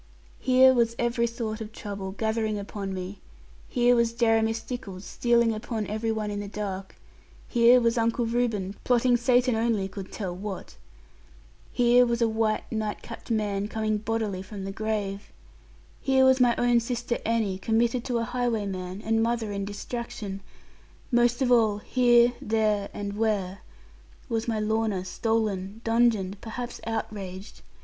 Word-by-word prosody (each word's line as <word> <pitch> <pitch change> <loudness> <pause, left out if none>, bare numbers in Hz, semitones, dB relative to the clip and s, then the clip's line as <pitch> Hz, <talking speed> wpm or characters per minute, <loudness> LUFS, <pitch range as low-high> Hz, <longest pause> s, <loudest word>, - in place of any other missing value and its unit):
Here 260 0 +6
was 235 -2 +2
every 235 0 +1
sort 225 -2 -4
of 215 0 -6
trouble 200 -3 -6
gathering 220 0 -1
upon 200 -1 -5
me, 185 +1 -5 0.5
here 245 0 +4
was 235 -1 +2
Jeremy 225 -1 +3
Stickles 225 -4 -6
stealing 235 -1 +2
upon 220 0 -3
every 220 +2 -2
one 215 -1 -2
in 205 - -3
the 205 - -5
dark; 195 -2 -5 0.5
here 240 +1 +6
was 235 0 +2
Uncle 230 +1 +1
Reuben 225 -5 -1
plotting 245 0 +3
Satan 245 +1 +3
only 220 -3 +1
could 195 -1 -8
tell 185 -5 -4
what; 195 - -6 1.0
here 245 0 +5
was 235 0 0
a 230 - +3
white 220 -1 0
night 215 -2 -3
capped 230 - -10
man 205 -3 0
coming 215 -1 -1
bodily 215 -3 -2
from 195 +1 -8
the 195 - -4
grave; 205 -1 -3 0.7
here 265 -1 +4
was 260 0 +5
my 245 -1 +4
own 240 -1 +3
sister 240 0 -2
Annie 220 -4 0
committed 230 +3 +1
to 245 -2 0
a 230 - 0
highwayman, 210 -6 -2
and 225 0 +1
mother 230 -2 0
in 200 -1 -3
distraction; 205 -1 -5 0.7
most 240 +1 +3
of 250 - +1
all 220 -4 +4
here, 240 +1 +4
there, 215 -2 +1
and 205 0 -5
where 205 -4 0 0.7
was 225 0 -1
my 225 -2 0
Lorna 215 -3 0
stolen, 210 -1 -1
dungeoned, 225 -4 +1
perhaps 240 +2 -6
outraged. 200 -3 -5
225 Hz, 150 wpm, -27 LUFS, 205-235 Hz, 1.0 s, Here